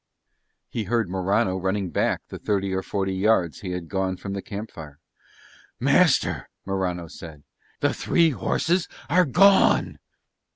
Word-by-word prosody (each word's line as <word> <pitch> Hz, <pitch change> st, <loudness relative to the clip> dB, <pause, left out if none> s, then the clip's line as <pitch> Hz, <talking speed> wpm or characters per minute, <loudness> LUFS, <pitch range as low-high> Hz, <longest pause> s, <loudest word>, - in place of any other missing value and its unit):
He 110 Hz, -3 st, -4 dB
heard 115 Hz, -3 st, 0 dB
Morano 95 Hz, 0 st, +1 dB
running 95 Hz, 0 st, -2 dB
back -, -, 0 dB
the -, -, -8 dB
thirty 100 Hz, -2 st, -1 dB
or 95 Hz, -, 0 dB
forty 95 Hz, 0 st, -2 dB
yards 95 Hz, -5 st, +1 dB
he 95 Hz, -, -6 dB
had 90 Hz, -2 st, -5 dB
gone 95 Hz, 0 st, -2 dB
from 100 Hz, +1 st, -6 dB
the 100 Hz, -, -3 dB
camp 105 Hz, +3 st, -7 dB
fire 75 Hz, -3 st, -11 dB, 0.8 s
"Master," -, -, +2 dB, 0.2 s
Morano 95 Hz, -3 st, -2 dB
said, 80 Hz, -3 st, -11 dB, 0.4 s
"the -, -, +2 dB
three 165 Hz, -2 st, +2 dB
horses 165 Hz, -, 0 dB, 0.2 s
are 180 Hz, +1 st, +5 dB
gone." 195 Hz, +7 st, +4 dB
95 Hz, 140 wpm, -24 LUFS, 90-110 Hz, 0.8 s, are